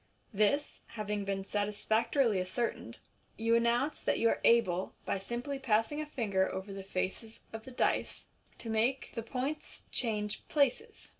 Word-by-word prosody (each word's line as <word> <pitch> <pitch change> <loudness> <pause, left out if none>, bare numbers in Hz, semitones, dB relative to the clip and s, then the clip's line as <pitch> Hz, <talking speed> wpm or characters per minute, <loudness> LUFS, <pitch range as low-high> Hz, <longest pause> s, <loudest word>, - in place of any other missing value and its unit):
This 215 +9 +2
haying 210 -2 -2
been 195 -1 -2
satisfactorily 215 +2 +1
ascertained, 185 +6 -2 0.4
you 230 +1 +2
announce 240 +5 +2
that - - +1
you 230 - +4
are - - 0
able, 190 -6 +3
by 195 - 0
simply 240 +7 -4
passing 240 +4 +1
a 305 - -5
finger 200 -9 0
over 190 +1 -5
the 195 - -5
faces 195 +4 -4
of 225 0 -7
the 260 - -9
dice, 245 - 0 0.3
to 230 - -7
make 235 +5 +1
the 230 - -3
points 265 +6 -4
change 210 -3 0
places. 305 - 0
225 Hz, 150 wpm, -32 LUFS, 205-255 Hz, 0.4 s, you